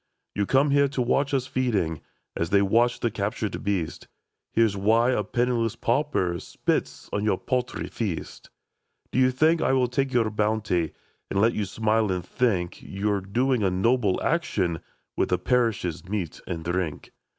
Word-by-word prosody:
ii 100 - 0
You - - +2
came 140 +2 +3
here 140 0 +4
to 135 -1 -5
watch 140 +4 +1
us 135 -3 +1
feeding, 105 - -1 0.3
A$ 85 - 0
they 100 +3 +3
watch 115 +5 +2
the 120 - +1
captured 105 0 -3
beast. 95 -6 -2 0.4
Hear 115 0 +4
why 110 +5 +2
a 105 -4 +1
penniless 115 0 0
pauper 115 -8 0
Spits - - -2
on 100 - 0
your 105 -3 +2
paltry 125 +3 -2
feast. 100 -8 -5 0.3
" - - -47
Do - - 0
you 130 0 +5
think 160 +6 +3
I - - +2
will 130 -2 +3
take 135 +2 -1
your 115 -4 +2
bounty, 105 -6 0 0.4
And 100 - 0
let 115 +3 +4
you 105 - -1
smile 110 +1 +1
and 90 -2 -2
think 95 -5 -1
You 100 +2 -2
're 100 -1 0
doing 120 +6 +1
a 100 - +3
noble 100 +2 +2
action 95 - 0 0.4
With - - 0
the - - +2
parish's 115 -9 0
meat 95 -6 -3
and 85 -3 -4
drink 85 -3 -3
110 Hz, 175 wpm, -26 LUFS, 95-125 Hz, 0.4 s, you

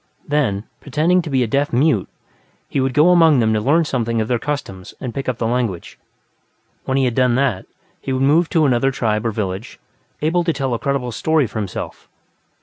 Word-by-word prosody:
Then, 135 -10 0 0.2
pretending 160 +6 +1
to 165 - -7
be 130 -3 +2
a - - -1
deaf 140 +5 0
mute, 125 - +2 0.6
he - - -2
would 130 -1 -1
go 155 +4 +5
among 165 -5 +5
them 110 -2 +2
to 110 - 0
learn 155 +8 +3
something 115 -5 -1
of 110 - -1
their 120 -1 0
customs 115 -10 -5
and 125 -3 -5
pick 135 -1 -3
up 125 - -2
the 115 - -2
language. 115 -7 -2 0.9
When 130 - 0
he 135 - +2
had 125 - 0
done 125 -1 +2
that, 125 -8 0 0.3
he - - -4
would 130 0 0
move 155 +5 +4
on - - -22
to 160 -3 +2
another 130 0 +2
tribe 110 -3 -1
or - - 0
village, 100 +2 -5 0.4
able 175 +3 +2
to 165 - +1
tell 135 -4 -2
a 115 - -2
credible 135 -3 -2
story 160 +4 +1
for 110 - -5
himself. 100 -4 -6
130 Hz, 215 wpm, -19 LUFS, 115-145 Hz, 0.9 s, go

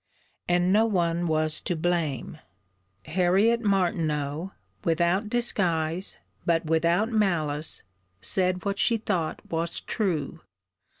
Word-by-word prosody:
And 175 +1 +3
no 220 +2 +4
one 175 -4 +1
was 155 -1 0
to 175 - -2
blame: 160 -5 -1 0.7
Harriet 190 +8 +3
Martineau, 170 -5 0 0.3
without 175 +4 +1
disguise, 180 -7 0 0.3
but 165 -1 +1
without 170 +7 +2
malice, 160 -8 0 0.4
said 185 - 0
what 200 0 -1
she 230 - +3
thought 170 -7 -2
was 165 +1 -2
true. 175 - -2
175 Hz, 105 wpm, -26 LUFS, 160-195 Hz, 0.7 s, no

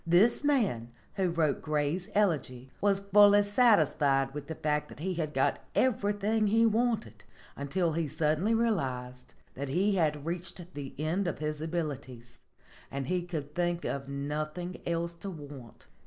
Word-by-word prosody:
This 195 - +4
man 215 - +1 0.2
who 190 -2 0
wrote 160 -4 +1
Gray's 155 +4 -1
'Elegy' 135 -10 0
was 200 -1 +2
fully 205 +1 +6
satisfied 155 - +3
with 145 -1 -6
the 160 - -5
fact 150 -1 -1
that - - -12
he 185 +4 -2
had 160 -3 -2
got 135 -2 +1 0.2
everything 215 -3 +1
he 225 +3 +4
wanted 230 0 0 0.3
until 165 +5 -1
he 160 0 -1
suddenly 155 +9 +1
realized 130 - -2 0.2
that 140 +1 -5
he 195 +7 +2
had 150 -4 0
reached 175 +1 -5
the 140 -2 -7
end 165 +6 -1
of 175 - -2
his 150 0 -3
abilities 140 -7 -5 0.5
and 135 0 -4
he 180 -1 +1
could 155 -5 -5
think 175 0 -1
of 140 0 -3
nothing 155 +5 -4
else 170 0 -1
to 170 +4 -7
want. 145 -8 -10
165 Hz, 155 wpm, -30 LUFS, 145-200 Hz, 0.5 s, fully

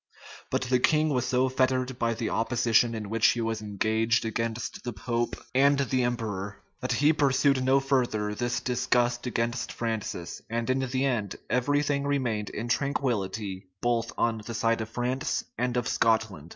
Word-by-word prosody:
But - - 0
the 125 0 +2
king 155 +4 +3
was 125 -3 0
so 130 0 +2
fettered 130 -1 0
by 115 -1 +1
the 115 0 -2
opposition 115 0 +2
in 105 -2 -5
which 115 0 +4
he 120 - -3
was 115 -1 -2
engaged 110 +3 +1
against 115 +1 -3
the 120 - -4
pope 120 +3 -2 0.2
and 140 +2 +4
the 135 -2 +1
emperor, 105 -5 -3 0.2
that 125 - -1
he 150 +2 +4
pursued 140 -2 +3
no 135 +1 +4
further 120 -6 0
this 120 +2 -1
disgust 125 -1 +1
against 120 +1 -1
Francis; 110 -7 -4
and 115 +2 -1
in 130 - +1
the 130 0 0
end, 115 -7 -1 0.2
every 145 +4 +2
thing 140 -1 0
remained 120 -7 -1
in 115 +3 -5
tranquillity 110 -8 -1
both 120 -1 0
on 115 -2 +1
the 115 +2 -6
side 115 +1 +1
of 110 - -5
France 125 +3 -1
and 125 +1 -1
of 125 0 0
Scotland. 110 -11 +1
120 Hz, 170 wpm, -28 LUFS, 110-130 Hz, 0.2 s, which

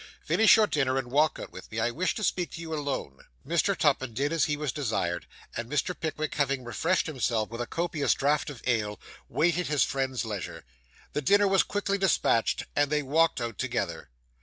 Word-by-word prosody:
'Finish 220 - +6
your 220 - +5
dinner, 135 -8 0
and 125 -2 -3
walk 150 +3 +3
out - - -7
with - - -11
me. 110 - -3
I 120 +2 +1
wish 180 +9 -1
to 215 - -4
speak 180 -2 0
to - - -7
you 160 -1 -5
alone.' 140 - -3 0.2
Mr. 170 +5 +1
Tupman 130 -6 +1
did 145 +5 0
as 165 - +3
he 150 -1 -1
was 150 -3 -2
desired; 110 - -2 0.3
and 115 0 -4
Mr. 150 +5 0
Pickwick 155 -2 -3
having 140 -2 0
refreshed 160 +10 0
himself 115 -7 -1
with 115 +1 -4
a 120 - -3
copious 165 -2 0
draught 145 +2 +1
of 135 -5 -10
ale, 105 -4 0 0.3
waited 170 +6 +1
his 150 -2 +3
friend's 130 -2 -1
leisure. 105 - -5 0.5
The 150 - -1
dinner 205 +8 +4
was 195 -1 +4
quickly 200 -1 -1
despatched, 150 -10 +2
and 145 -1 +3
they 150 -1 +1
walked 160 +2 +2
out 115 -4 -4
together. - - -2
145 Hz, 200 wpm, -28 LUFS, 120-165 Hz, 0.5 s, Finish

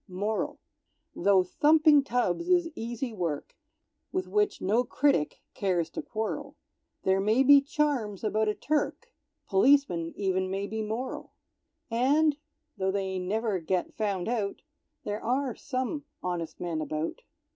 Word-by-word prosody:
MORAL. 205 +3 -2 0.6
Tho' 190 0 +4
thumping 300 - +5
tubs 245 - 0
is 350 -2 +3
easy 235 0 -4
work, 170 -7 -3 0.6
With 370 0 -2
which 420 -1 +1
no 220 +6 +2
critic 255 - +1
cares 180 -5 0
to - - -4
quarrel, 220 -6 -4 0.5
There 190 0 +3
may 215 +6 +3
be 280 +1 +8
charms 275 -9 -1
about 215 0 +1
a 210 - +1
Turk, 305 0 -2 0.3
Policemen 195 -6 +3
even 190 -1 0
may 195 +1 -2
be 220 +2 -4
moral; 225 +5 -4 0.6
And, 285 +6 +3 0.4
tho' 190 0 0
they 190 -1 -1
never 205 +2 -1
get 175 +2 -1
found 200 -5 -2
out, 215 -4 -2 0.4
There 210 +1 -4
are 255 +2 0
some 260 +5 -3 0.2
honest 175 -2 -3
men 170 -3 -2
about. 155 +1 -3
215 Hz, 135 wpm, -28 LUFS, 190-275 Hz, 0.6 s, be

